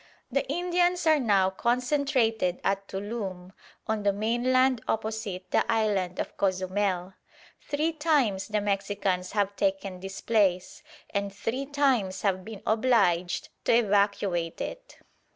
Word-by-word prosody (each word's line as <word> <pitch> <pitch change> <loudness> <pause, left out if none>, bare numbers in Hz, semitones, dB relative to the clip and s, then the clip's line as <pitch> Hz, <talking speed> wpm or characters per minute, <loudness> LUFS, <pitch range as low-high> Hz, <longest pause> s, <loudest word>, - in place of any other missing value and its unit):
The 275 +1 -1
Indians 355 +1 +1
are 315 -2 +5
now 200 -6 +3
concentrated 240 -4 +1
at 195 0 0
Tuloom, 195 -3 -5 0.3
on 220 -1 -1
the 205 0 +3
mainland 240 +4 +2
opposite 215 -4 -3
the - - +3
island 200 -5 0
of - - -4
Cozumel. 185 -1 0 0.5
Three 300 +3 -1
times 290 -11 +1
the 215 -1 0
Mexicans 195 -2 -1
have 200 -1 0
taken 195 -1 -1
this 195 +1 -7
place, 200 +2 +1 0.3
and 200 -1 -1
three 240 +7 -3
times 260 -10 +1
have 190 -2 +1
been 215 -1 -9
obliged 215 -7 +2 0.2
to - - +4
evacuate 200 -6 +1
it. - - -7
205 Hz, 125 wpm, -27 LUFS, 190-250 Hz, 0.5 s, are